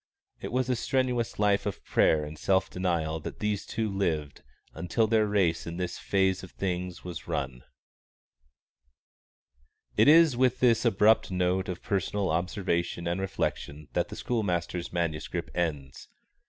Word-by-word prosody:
It - - -6
was 130 0 0
a 125 - +1
strenuous 125 -1 -1
life 105 0 +2
of 100 - -5
prayer 75 -1 +3
and 75 +1 -8
self 95 +4 +1
denial 85 -3 -1
that - - -7
these 105 -1 -2
two 110 0 -1
lived 80 -8 -2 0.3
until 95 +6 0
their 110 -1 +2
race 95 -6 +1
in 85 +1 -5
this 90 -1 -3
phase 95 -1 +1
of 95 - -10
things 90 -1 -4
was 90 -2 -7
run. 65 -2 -3 2.4
_It - - +6
is 160 -2 +7
with 130 0 +2
this 120 -1 +3
abrupt 110 0 +4
note 90 0 0
of 90 - -5
personal 100 -2 -1
observation 85 0 -1
and 85 +2 -1
reflection 75 -5 -3
that - - 0
the - - -7
schoolmaster's 90 -6 -2
manuscript 85 -3 -3
ends. 75 -6 -3
95 Hz, 145 wpm, -28 LUFS, 85-105 Hz, 2.4 s, is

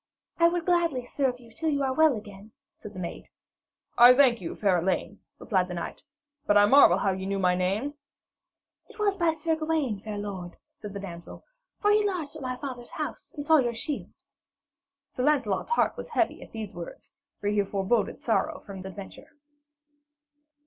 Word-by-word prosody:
'I 335 - +7
would 340 -1 -1
gladly 335 -8 +1
serve 255 -1 -1
you 235 -2 -16
till 320 +7 -1
you 285 -2 0
are 265 -1 0
well 315 -1 +4
again,' 210 0 -11 0.2
said 210 - -11
the - - -6
maid. 170 -2 -6 0.7
'I 245 +1 +10
thank 250 -5 +4
you, 170 - -5
fair 190 -4 +2
Elaine,' 190 +3 -2 0.2
replied 185 -4 0
the 180 - -6
knight, 170 - -6 0.4
'but 205 - +5
I 205 - +7
marvel 210 -6 +7
how 195 0 +1
ye 190 0 -4
knew 200 0 -1
my 180 -2 +3
name?' 195 +10 -1 1.0
'It - - -16
was 410 -2 +1
by 340 -3 +2
Sir 320 0 0
Gawaine, 310 -9 -1
fair 210 -1 -5
lord,' 190 -4 -6 0.2
said 205 -1 -9
the - - -3
damsel, 170 -4 -9 0.4
'for 415 - +4
he 425 0 +4
lodged 360 -8 -2
at 310 - -8
my 255 -1 -3
father's 250 -3 -7
house 305 -1 -5
and 290 - -4
saw 315 +1 +6
your 240 -3 0
shield.' 280 +5 -4 1.0
Sir 250 - -3
Lancelot's 270 - +1
heart - - +2
was - - -7
heavy 475 - 0
at - - -12
these 220 -3 -6
words, 170 -1 -9 0.3
for 205 - -1
he 205 -1 +2
foreboded 200 +2 -1
sorrow 290 +6 0
from 200 -2 -8
this 190 - -7
adventure. 200 +8 -11
235 Hz, 190 wpm, -27 LUFS, 195-300 Hz, 1.0 s, I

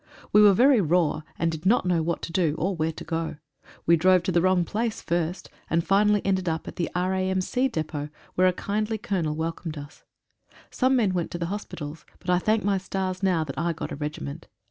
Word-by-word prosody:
We 210 - +7
were 205 -2 +7
very 255 +1 +5
raw, 170 -2 +2 0.2
and 165 0 +1
did 160 0 -6
not 200 +2 +3
know 175 -2 +2
what 170 +1 -2
to - - -4
do, 165 -3 +1
or 190 +4 -1
where 160 -1 0
to - - -9
go. 165 -1 -3 0.5
We 170 - +6
drove 185 +1 +4
to 185 - 0
the 175 - +3
wrong 185 -1 +3
place 220 +4 -2
first, 170 +1 -2 0.2
and 165 +1 +1
finally 205 +1 +3
ended 190 -2 +1
up 160 0 -3
at - - -8
the 170 - -1
R.A.M.C. 190 +7 0
depot, 155 - -4 0.2
where 185 +1 +4
a - - +4
kindly 210 +4 -2
Colonel 190 -9 -2
welcomed 160 0 -4
us. 145 +1 -10 0.7
Some 260 0 +2
men 215 -7 +2
went 175 -2 -1
to 170 0 -3
hospitals, 165 -5 -6
but 180 - -3
I 180 - +4
thank 215 +3 +1
my 195 -1 +1
stars 185 0 -3
now 180 -4 +2
that 140 -2 -6
I 170 +1 0
got 165 - -6
a - - -3
regiment. 145 - -6
180 Hz, 210 wpm, -26 LUFS, 165-195 Hz, 0.7 s, We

